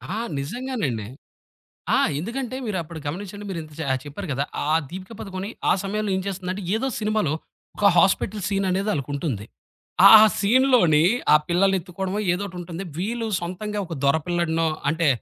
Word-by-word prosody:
ఆ! - - -2 0.2
నిజంగానండి. 150 - -3 0.9
ఆ! - - +4 0.2
ఎందుకంటే 245 - -4
మీరు 195 -4 -2
అప్పుడు 160 0 -9
గమనించండి 200 +6 -5
మీరు 170 -3 -3 0.2
జ - - -5 0.2
చెప్పారు 155 +5 -7
కదా. 140 +2 -1 0.3
ఆ - - +4 0.2
దీపిక 185 +4 -8
పదుకొని 190 0 -5 0.2
ఆహ్, 190 - +3
సమయంలో 210 +1 -2
ఏం 190 - -2
చేస్తుందంటే 190 0 -4
ఏదో 265 +4 -1
సినిమాలో 215 -8 0 0.4
ఒక 205 - +2
హాస్పిటలు 195 +3 +2
సీననేది 195 +1 0
ఆళ్ళకుంటుంది. 140 - -3 0.6
ఆ - - +9 0.3
సీన్‌లోని 210 - +4 0.3
ఆ - - +9
పిల్లలెత్తుకోవడమో 190 +1 0
ఏదోకటుంటుంది. 180 -2 -5 0.2
వీళ్ళు 225 +4 -2
సొంతంగా 195 +5 -4
ఒక 165 - -5
దొర 140 +2 +4
పిల్లాడినో 165 -2 0 0.2
అంటే 165 -2 +1
185 Hz, 140 wpm, -23 LUFS, 165-210 Hz, 0.9 s, ఆ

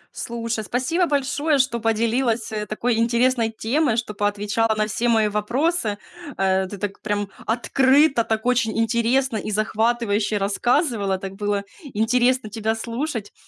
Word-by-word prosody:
Слушай, 230 -1 -3
спасибо 260 - 0
большое, 285 +1 +1
что 255 -3 +1
поделилась, 225 +1 0
а, 210 -1 -3
такой 230 +2 -1
интересной 235 0 +2
темой, 235 +3 0
что 230 -2 -2
поотвечала 210 +2 0
на 215 0 +1
все 230 +3 -1
мои 220 -2 +3
вопросы, 225 - 0 0.4
э. 190 0 +1
Ты 205 - -8
такпрям 205 0 -3 0.2
открыто, 265 +3 +3
так 220 +1 -2
очень 245 -3 +1
интересно 235 +2 +1
и 210 - -4
захватывающе 215 0 0
рассказывала, 205 - +1
так 190 0 -7
было 205 0 -1 0.2
интересно 250 -2 +1
тебя 220 0 -1
слушать, 230 -1 -4
225 Hz, 135 wpm, -22 LUFS, 210-250 Hz, 0.4 s, мои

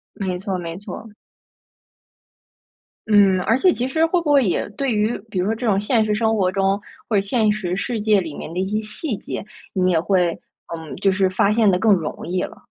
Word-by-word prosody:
没 185 -3 -3
错 190 0 -3
没 170 -1 -6
错。 210 +2 -8 1.9
嗯， 200 -3 +5
而 225 +6 +2
且 365 +7 +4
其 250 +2 -2
实 320 +4 +2
会 345 +2 +1
不 305 -3 0
会 275 -4 +5
也 175 - -1
对 265 +3 -1
于 215 +2 0
比 200 - -5
如 180 - 0
说 215 - +1
这 230 +2 -3
种 195 -2 +3
现 220 +2 +2
实 210 -1 0
生 220 0 +1
活 185 -2 +2
中， 195 +1 0 0.3
或 215 - +2
者 - - +3
现 215 +1 +1
实 190 -4 -2
世 225 +3 -2
界 210 -2 +3
里 160 -4 -6
面 155 - -7
的 180 - -3
一 190 - 0
些 210 +2 -1
细 215 +3 -4
节， - - -6 0.3
你 185 -1 +2
也 165 - +3
会， 180 -1 +1 0.3
嗯， 160 -2 -7
就 195 - +2
是 190 0 +2
发 190 +2 +2
现 215 -1 +4
得 180 - +3
更 220 +3 +3
容 165 -5 -3
易 180 +2 -1
了？ - - -9
200 Hz, 240 characters per minute, -21 LUFS, 185-220 Hz, 1.9 s, 嗯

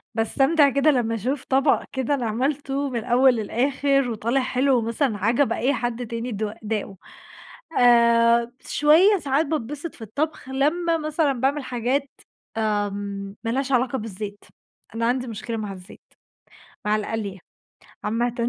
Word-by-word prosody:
باستمتع 275 +6 +3
كده 280 +3 +3
لمّا 230 -4 0
أشوف 255 +6 -2
طَبَق 270 +1 +2
كده 265 +1 -1
أنا 260 -4 -1
عملتُه 270 +4 -1
من 240 - -2
الأوّل 250 +3 +4
للآخر، 270 +4 +1
وطالع 235 +4 0
حلو 260 +1 +2
ومثلًا 230 0 0
عَجَب 235 +7 +2
أي 270 +4 +1
حد 240 0 -3
تاني، 230 +2 -4
د 210 0 -3
داقه 210 -3 -4 0.8
آآ، 235 -1 +5
شويّة 340 +8 +4
ساعات 285 +1 +1
باتبسط 295 +2 -4
في - - -14
الطبخ، 285 +6 -3
لمّا 330 +6 +1
مثلًا 310 -2 0
باعمل 270 +3 0
حاجات 255 +3 -1 0.5
آآ، 210 -2 0 0.6
مالهاش 265 +4 -1
علاقة 255 0 +1
بالزيت، 205 -2 -6 0.5
أنا 230 - 0
عندي 250 +1 0
مشكلة 230 +1 -5
مع 210 -3 -4
الزيت، 185 -1 -12 0.9
مع 210 0 +3
القلي 210 -2 -4 0.7
عامةً، 235 +3 0
245 Hz, 135 wpm, -23 LUFS, 225-280 Hz, 0.9 s, آآ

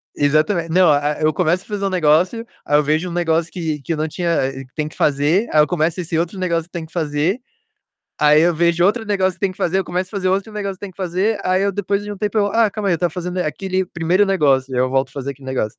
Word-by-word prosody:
Exatamen 155 +4 +1
não, 180 +1 +4
a 145 +1 +2
a 150 - -9
eu 155 0 +2
começo 180 +2 +1
a - - -24
fazer 205 -2 -3
um 195 - +1
negócio, 180 +6 +2 0.2
aí 145 - +3
eu 150 - +3
vejo 155 +5 0
um - - -6
negócio 165 -1 0
que 160 -5 -3
que 165 - -3
eu - - -3
não 155 +1 -1
tinha 175 +1 -2 0.2
eh, 135 0 -8
que 130 - -28
tem 150 -1 -2
que - - -16
fazer, 150 +9 +2
aí 155 - +6
eu 150 - +5
começo 170 +1 0
esse 165 -1 -3
outro 175 +3 -2
negócio 170 -3 -1
que 175 - -28
tem 165 - -5
que 160 - -19
fazer, 160 - 0 0.8
aí 150 +1 +5
eu 175 +1 +3
vejo 170 +1 +2
outro 220 +3 +1
negócio 190 -3 +1
que - - -30
tem 195 -2 0
que - - -16
fazer, 175 +2 0
eu 185 - -2
começo 180 +1 -3
a - - -25
fazer 185 - -1
outro 195 +3 -1
negócio 200 -2 -4
que - - -31
tem 200 -2 -6
que - - -31
fazer, 190 +4 -1
aí 185 +1 +2
eu 200 - +1
depois 200 +1 -1
de 205 - -6
um 205 - -7
tempo, 210 +1 -2
eu: 205 -1 +3
"Ah, 225 +1 +2
calma 205 -1 -2
aí, - - +3
eu - - +2
estava 175 +2 0
fazendo 180 0 -4
aquele 185 +2 -1
primeiro 175 +4 +1
negócio". 135 -8 +2
Aí 125 - 0
eu 130 - +2
volto 135 +1 +1
a - - -22
fazer 140 0 -4
aquele 135 -1 -13
negócio. 125 -5 -2
175 Hz, 295 wpm, -19 LUFS, 155-190 Hz, 0.8 s, aí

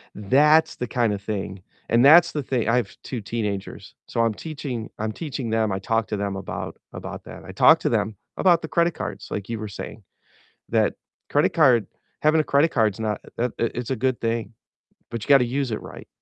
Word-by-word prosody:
that's 150 +10 +4
the 125 - -4
kind 115 -3 +1
of 100 - -5
thing 100 -2 -4 0.3
and 120 +2 +4
that's 170 +4 +8
the 150 -2 -2
thing 125 -4 -1
I 115 - +3
have 125 - -2
2 125 -4 -5
teenagers, 105 -2 -4
so - - -3
I'm 115 -1 +2
teaching 135 -5 -6
I'm 110 0 -1
teaching 140 -7 -5
them 110 -2 +1
I 95 - -1
talk 115 0 0
to 105 - -2
them 100 -1 -2
about 95 -3 -5 0.2
about - - -7
that. - - -10
I - - -8
talk - - +6
to - - +1
them 105 -2 0 0.2
about 175 -3 +4
the 160 - -5
credit 170 0 +2
cards, - - -6
like 100 -1 -4
you 115 - -2
were 110 - -4
saying, 100 +1 -8 0.7
that - - +2 0.3
credit 145 - +2
card 130 -9 +4 0.3
having 155 +1 +4
a - - -4
credit 145 +4 +3
card's 110 -4 +1
not 105 -1 -2 0.2
uh, 120 - +2
it 115 - +1
it's 120 +1 -4
a 130 - +1
good 130 +1 0
thing, 115 0 -2 0.6
but 115 -2 -4
you - - -9
gotta 135 -3 +7
use 135 +2 -1
it 110 - -3
right, - - -11
115 Hz, 215 wpm, -24 LUFS, 105-140 Hz, 0.7 s, that's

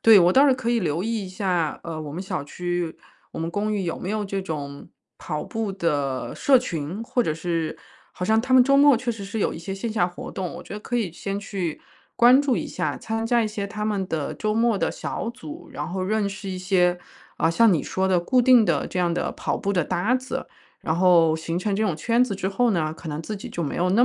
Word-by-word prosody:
对， 225 -2 +9
我 175 +1 +5
倒 275 +6 +6
是 270 - +5
可 255 -2 -2
以 240 - +2
留 165 -4 -1
意 220 -2 -2
一 - - -8
下， 180 -5 -1
呃， 165 -2 -5
我 150 -2 -6
们 180 - -4
小 185 -6 -3
区、 175 +1 -3 0.4
我 - - -7
们 165 +1 -2
公 205 +4 -1
寓 200 - -1
有 170 -2 -3
没 180 - -5
有 215 0 -1
这 195 0 -2
种 145 -6 -6 0.3
跑 150 -1 -4
步 220 -3 -3
的 145 -8 -1
社 270 -2 +5
群， 175 -4 -4
或 240 +2 -1
者 155 - -1
是 165 -1 -2 0.4
好 180 - -4
像 220 +3 +3
他 260 +2 +1
们 255 - +8
周 275 +2 +4
末 285 -2 +7
确 240 +1 -2
实 220 -4 -6
是 205 +3 -4
有 - - +1
一 - - -7
些 190 +4 -5
线 215 +3 -4
下 180 -5 +2
活 175 - -8
动， 185 -3 -4
我 - - -8
觉 - - -11
得 205 - -4
可 245 - -5
以 220 -7 0
先 195 +3 -4
去 190 -6 -4 0.3
关 245 +3 +7
注 280 -4 +1
一 - - -2
下， - - -2
参 225 0 -3
加 240 0 +3
一 220 - -1
些 210 -1 -4
他 210 +1 -4
们 205 -3 -1
的 155 -5 -2
周 215 -1 -2
末 230 -2 +2
的 - - 0
小 - - -4
组。 300 +6 -10
然 - - -4
后 185 +1 -4
认 205 +1 0
识 195 0 -7
一 185 - -3
些， 180 -1 +2 0.4
啊， 165 - +3
像 225 +5 +5
你 155 - 0
说 190 0 -1
的 185 -2 +3
固 250 +9 +3
定 245 -2 +6
的 165 -7 +1
这 180 - -2
样 175 -1 +1
的 - - -1
跑 - - -2
步 200 - -1
的 180 -3 +2
搭 205 +8 +1
子， 260 0 -3 0.4
然 160 - 0
后 170 -2 +5
形 165 +1 -3
成 200 +2 -1
这 215 - 0
种 190 -8 0
圈 230 +9 +2
子 210 -6 -1
之 190 - -2
后 240 +5 +2
呢， 160 -5 0
可 165 - -9
能 150 0 -3
自 210 +6 -5
己 195 - -8
就 175 - -6
没 150 - -2
有 180 +1 +1
那 230 +6 +5
195 Hz, 280 characters per minute, -24 LUFS, 170-225 Hz, 0.4 s, 对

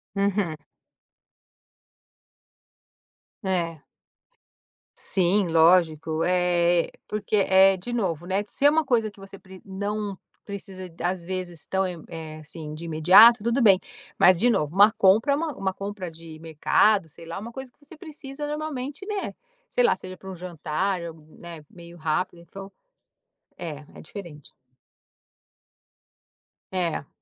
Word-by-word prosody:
Uhum. 195 -5 0 2.9
É. 170 -4 -1 1.2
Sim, 190 +1 +2
lógico. 160 -1 +3
Eh, 175 -1 +2 0.2
porque, 210 0 -2
eh, 190 -1 +5
de 240 +7 -7
novo, 175 -8 -2
né, 190 +3 0
se 280 - -2
é - - +9
uma 320 +1 +2
coisa 230 -6 +1
que 200 - -20
você 195 0 -11
pr 190 -1 -14
não 200 0 -4 0.3
precisa 190 -2 -8
d 165 0 -11
às 180 -1 -1
vezes, 180 -3 -6
tão 190 0 0
e 175 -3 -7
eh, 160 -2 -8
assim, 155 0 -9
de 165 +2 -8
imediato, 190 +8 +7
tudo 235 +4 +1
bem. 195 -5 +6 0.4
Mas, 185 -1 +6
de 245 - +4
novo, 155 -9 0
uma 205 +3 +7
compra 220 +6 +4
é - - +3
uma 310 -2 -3
uma 190 -1 -1
compra 195 -2 -6
de 160 -1 -12
mercado, 165 +4 +2
sei 165 +3 -13
lá, 165 - -5
uma 225 +4 -7
coisa 265 0 -8
que - - -42
você 325 - -12
precisa, 295 -2 -8
normalmente, 295 +1 -5
né, 410 -1 -4 0.3
sei - - +2
lá, 470 - +4
seja 185 0 -10
para 190 +1 -9
um - - -7
jantar 175 +2 -2
ou, 165 -1 -6 0.2
né, 170 -3 -10
meio 170 0 -13
rápido, 165 +2 -2
então 195 +3 -11 0.9
é, 150 -3 -7
é - - -11
diferente. 155 -5 -10 2.2
É. 170 -6 -2
185 Hz, 145 wpm, -25 LUFS, 170-210 Hz, 2.9 s, é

